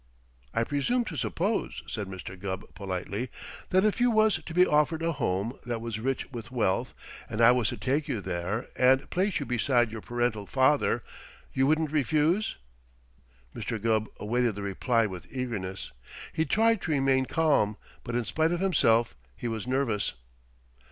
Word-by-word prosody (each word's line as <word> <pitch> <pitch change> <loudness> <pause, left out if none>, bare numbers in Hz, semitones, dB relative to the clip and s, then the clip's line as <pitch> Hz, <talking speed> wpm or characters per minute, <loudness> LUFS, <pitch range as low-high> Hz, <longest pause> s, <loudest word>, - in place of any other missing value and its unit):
"I 115 - +1
presume 190 - 0
to - - -5
suppose," 205 +6 -1
said 105 -4 -4
Mr. 95 0 -7
Gubb 95 0 -6
politely, 100 +5 -4 0.4
"that 185 +2 +4
if 215 +3 +1
you 245 - +5
was 215 -6 +3
to 165 - -8
be 180 +2 +5
offered 155 +1 +2
a 165 - +1
home 100 - -2
that 120 -1 -3
was 115 -1 -4
rich 135 +4 -2
with 120 -2 -7
wealth 115 -7 0 0.3
and 105 - -4
I 115 +1 +8
was 125 -3 +2
to - - -5
take 140 +3 0
you 110 - -1
there 95 +5 -3
and 130 +2 +4
place 190 +2 +1
you 145 - -3
beside 120 -1 +2
your 110 -1 -6
parental 120 -4 -1
father, 130 -3 +2 0.5
you 135 +1 +2
wouldn't 155 0 +2
refuse?" 155 - +1 1.0
Mr. 115 0 -3
Gubb 110 0 +1
awaited 120 +1 0
the 100 - -5
reply 115 +4 +1
with 95 -4 -7
eagerness. 110 -7 -4 0.4
He 160 - +1
tried 225 +2 +3
to 160 - -2
remain 135 -2 +3
calm, 140 -10 +2 0.3
but 120 -1 -4
in 120 -1 0
spite 160 +8 +1
of 175 - 0
himself 120 - +3 0.2
he 120 - -5
was 115 0 -3
nervous. 125 -6 0
125 Hz, 170 wpm, -28 LUFS, 110-155 Hz, 1.0 s, I